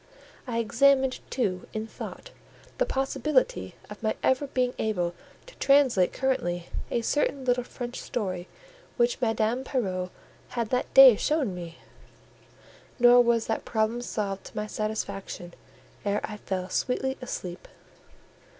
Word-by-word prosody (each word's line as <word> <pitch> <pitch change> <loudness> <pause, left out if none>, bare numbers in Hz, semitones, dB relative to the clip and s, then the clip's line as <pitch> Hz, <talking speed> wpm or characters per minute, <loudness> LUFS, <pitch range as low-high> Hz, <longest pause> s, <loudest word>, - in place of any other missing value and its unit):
I 235 -2 -2
examined, 265 +4 +3
too, 195 -8 -1
in 215 0 -3
thought, 225 - -9 0.5
the - - +2
possibility 300 - 0
of - - -10
my - - 0
ever 260 +2 +2
being 250 -2 0
able 180 -6 0 0.3
to - - -14
translate 265 -10 +4
currently 175 -10 -1 0.2
a 235 - 0
certain 280 0 0
little 250 -1 +2
French 245 0 -6
story 185 -6 -3 0.5
which 240 0 +2
Madame 225 +2 +1
Pierrot 185 -9 -2 0.5
had 230 -2 -1
that 250 0 0
day 270 -4 +11
shown 295 -10 0
me; 170 -2 -8 1.2
nor 245 0 +7
was 235 -1 +2
that 225 - -2
problem 220 +1 0
solved 200 -5 -3
to - - -12
my 210 - -1
satisfaction 200 -4 -4 0.5
ere 205 0 +1
I 210 - -5
fell 185 -3 -3
sweetly 265 +5 -1
asleep. 180 -7 -6
235 Hz, 130 wpm, -27 LUFS, 200-260 Hz, 1.2 s, day